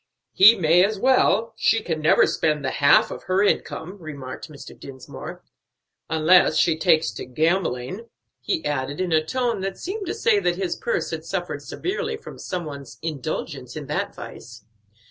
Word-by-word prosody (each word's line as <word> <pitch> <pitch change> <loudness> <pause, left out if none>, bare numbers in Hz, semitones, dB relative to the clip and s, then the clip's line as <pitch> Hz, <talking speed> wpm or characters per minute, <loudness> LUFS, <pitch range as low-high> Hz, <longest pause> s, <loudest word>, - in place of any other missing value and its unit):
"He 215 +4 +8
may 170 +1 +4
as 210 +2 0
well; 230 -1 +2
she 225 - +2
can 160 -2 -3
never 155 - +5
spend 150 -3 0
the - - 0
half 140 0 +4
of - - -8
her 185 +2 +2
income," 195 -2 -1
remarked 140 -6 -8
Mr. 145 -2 -11
Dinsmore. 130 -2 -10 0.7
"Unless 160 +3 +4
she 165 - +3
takes 160 -1 +2
to - - -7
gambling," 160 - -1 0.3
he 340 -5 -2
added, 140 0 -2
in 185 -2 -1
a 155 -1 +3
tone 235 +3 -1
that 195 0 -4
seemed 395 +1 -5
to - - -2
say 215 -3 +3
that 175 -2 0
his 185 -2 -2
purse 485 - -2
had - - -4
suffered - - -4
severely 440 +4 -3
from - - -11
some 180 -3 -4
one's 140 -3 -9
indulgence 155 -6 -5
in - - -6
that - - -3
vice. 115 -1 -11
175 Hz, 170 wpm, -23 LUFS, 150-210 Hz, 0.7 s, He